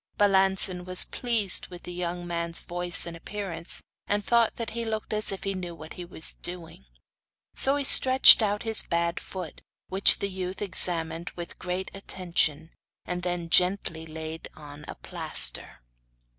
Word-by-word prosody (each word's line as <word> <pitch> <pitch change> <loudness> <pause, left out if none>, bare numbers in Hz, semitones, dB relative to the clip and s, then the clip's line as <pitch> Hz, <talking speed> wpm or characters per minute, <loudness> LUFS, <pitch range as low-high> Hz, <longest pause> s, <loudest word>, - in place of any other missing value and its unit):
Balancin 190 -2 +2
was 185 0 +1
pleased 225 -6 +1
with 175 -1 -12
the 180 - -8
young 175 0 -4
man's 170 -1 -3
voice 175 0 +3
and 170 -1 -7
appearance, 170 -1 -5 0.2
and 205 0 -1
thought 235 -2 +2
that 230 -2 -5
he 235 +1 -4
looked 220 -1 -4
as 215 0 +3
if 195 - -7
he 195 - -2
knew 175 -2 -7
what 155 0 -11
he 180 - -9
was 165 -2 -4
doing. 170 - -4 0.7
So 270 +1 +5
he 285 - -1
stretched 260 -2 +8
out 210 -1 -1
his 225 -1 +1
bad 170 0 -2
foot 180 -4 -9 0.3
which 190 +1 +5
the 200 - -3
youth 185 0 -6
examined 170 -4 -3
with 175 -1 -9
great 180 +1 -4
attention, 170 -5 -2 0.3
and 180 0 -4
then 175 -1 -3
gently 180 -3 +1
laid 160 0 -7
on 150 -1 -12
the - - -8
plaster. - - -1
180 Hz, 160 wpm, -26 LUFS, 170-200 Hz, 0.7 s, stretched